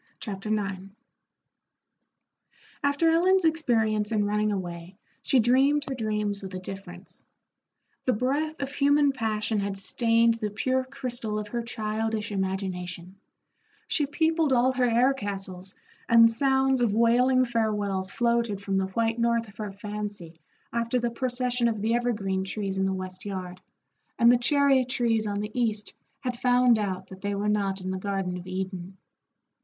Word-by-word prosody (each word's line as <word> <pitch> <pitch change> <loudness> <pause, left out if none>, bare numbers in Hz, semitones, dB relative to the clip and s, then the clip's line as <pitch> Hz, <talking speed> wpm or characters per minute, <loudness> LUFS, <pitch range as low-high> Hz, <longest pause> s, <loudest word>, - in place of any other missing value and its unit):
Chapter 200 -1 -6
IX 200 -3 -2 2.0
After 285 +4 +3
Ellen's 365 +2 +3
experience 225 -9 +1
in 210 -2 +1
running 210 +1 +1
away, 175 -1 -5 0.2
she 265 - +3
dreamed 270 +5 +3
her 275 - -2
dreams 210 -4 -1
with 190 -1 -7
a - - -3
difference. 185 -1 -7 0.8
The 255 - +3
breath 290 +7 -1
of 275 +1 -5
human 285 0 +3
passion 220 -3 -1
had 200 -1 -2
stained 230 +3 +2
the 225 -2 -3
pure 260 +5 0
crystal 245 -5 -3
of 210 -1 -4
her 235 +2 -2
childish 220 -2 -3
imagination; 190 -2 -4 0.7
she 290 - +1
peopled 320 0 +1
all 255 0 +4
her 255 -1 +1
air 245 +4 +4
castles, 195 -5 -5 0.3
and 230 0 +7
sounds 265 +1 +2
of 220 -4 +2
wailing 250 +3 +4
farewells 210 -5 -1
floated 235 -3 0
from 195 -1 -1
the 190 - -1
White 225 +4 -1
North 235 -1 +1
of 200 - -18
her 210 -2 -4
fancy 205 -4 -7 0.3
after 235 +1 0
the 240 -1 -1
procession 250 0 -1
of 220 -2 -1
the 220 +3 0
evergreen 210 -6 0
trees 195 0 -3
in 190 - +2
the - - 0
west 185 0 -6
yard, 185 -2 -6 0.6
and 235 0 +6
the 245 - +5
cherry 275 +1 +4
trees 235 -3 +1
on 205 0 -2
the 210 +1 -5
east 220 -4 -1 0.3
had 250 -2 -4
found 245 -2 +4
out 190 -2 -3
that 190 0 -11
they 205 0 -2
were 205 +1 -2
not 200 -2 0
in 185 0 -3
the 190 - -3
Garden 195 -2 -2
of 180 0 -8
Eden. 185 0 -5
215 Hz, 160 wpm, -27 LUFS, 195-250 Hz, 2.0 s, and